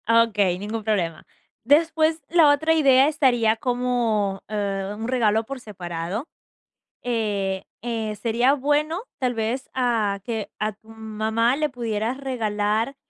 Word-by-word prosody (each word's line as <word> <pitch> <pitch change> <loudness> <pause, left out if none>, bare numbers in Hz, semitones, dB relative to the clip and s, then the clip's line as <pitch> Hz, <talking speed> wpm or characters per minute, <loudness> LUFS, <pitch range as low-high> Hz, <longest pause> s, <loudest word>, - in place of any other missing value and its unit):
Ah, 230 0 +6
okey, 205 -5 +1
ningún 215 +2 -4
problema. 180 -7 -1 0.4
Después, 315 +4 +3
la 330 -3 +6
otra 315 +3 +2
idea 275 -4 +5
estaría 245 -7 +3
como, 235 -5 0
eh, 200 -2 -2
un 225 +1 -4
regalo 225 -4 +2
por 275 +2 -6
separado. 180 - -5 0.8
Eh 205 -5 -1 0.2
eh 225 -3 -3
sería 240 +4 +2
bueno, 295 +5 0 0.2
tal 250 -2 0
vez, 230 +4 -2
a 225 -6 0
que 225 -3 -4
a 215 0 -1
tu 215 +2 -26
mamá 220 +2 -1
le 305 +1 0
pudieras 230 -2 -2
regalar, 225 -1 -1
230 Hz, 135 wpm, -23 LUFS, 210-260 Hz, 0.8 s, Ah